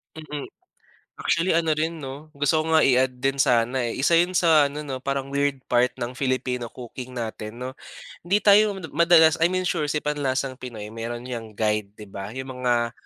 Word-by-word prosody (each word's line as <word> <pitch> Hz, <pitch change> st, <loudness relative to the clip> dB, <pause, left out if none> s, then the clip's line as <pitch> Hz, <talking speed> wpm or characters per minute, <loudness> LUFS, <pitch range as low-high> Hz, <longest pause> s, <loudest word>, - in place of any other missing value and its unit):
Mm. 150 Hz, -2 st, -6 dB, 0.7 s
Actually 170 Hz, +3 st, +1 dB
ano 160 Hz, -2 st, +2 dB
rin 160 Hz, +1 st, -2 dB
'no, 145 Hz, +3 st, -9 dB
gusto 145 Hz, +2 st, +1 dB
ko 160 Hz, -, -2 dB
nga 160 Hz, -, +6 dB
i-add 130 Hz, 0 st, +3 dB
din 135 Hz, +1 st, 0 dB
sana 125 Hz, -1 st, +2 dB
eh, 115 Hz, -, -2 dB
isa 155 Hz, +5 st, +2 dB
'yon 175 Hz, +2 st, +3 dB
sa 160 Hz, -4 st, +5 dB
ano 150 Hz, -, -5 dB
'no, 140 Hz, -3 st, -5 dB
parang 135 Hz, 0 st, -2 dB
weird 140 Hz, -1 st, 0 dB
part 125 Hz, +1 st, +3 dB
ng 120 Hz, +2 st, -4 dB
Filipino 130 Hz, -2 st, -1 dB
cooking 125 Hz, +1 st, -9 dB
natin, 115 Hz, -1 st, -6 dB
'no. 130 Hz, +2 st, -6 dB, 0.4 s
Hindi 195 Hz, +5 st, 0 dB
tayo 205 Hz, 0 st, +5 dB, 0.2 s
madalas, 170 Hz, -2 st, +5 dB
I 165 Hz, -, +5 dB
mean 185 Hz, +1 st, -1 dB
sure 150 Hz, -4 st, -1 dB
si 150 Hz, +1 st, -2 dB
Panlasang 135 Hz, -3 st, -2 dB
Pinoy 110 Hz, -4 st, -8 dB
mayroon 115 Hz, +2 st, -5 dB
‘yang 115 Hz, -4 st, -7 dB
guide 105 Hz, -1 st, -1 dB
'di 105 Hz, -1 st, -11 dB
ba, 100 Hz, +3 st, -7 dB
'yong 130 Hz, 0 st, -5 dB
mga 120 Hz, -2 st, +1 dB
135 Hz, 190 wpm, -24 LUFS, 120-155 Hz, 0.7 s, nga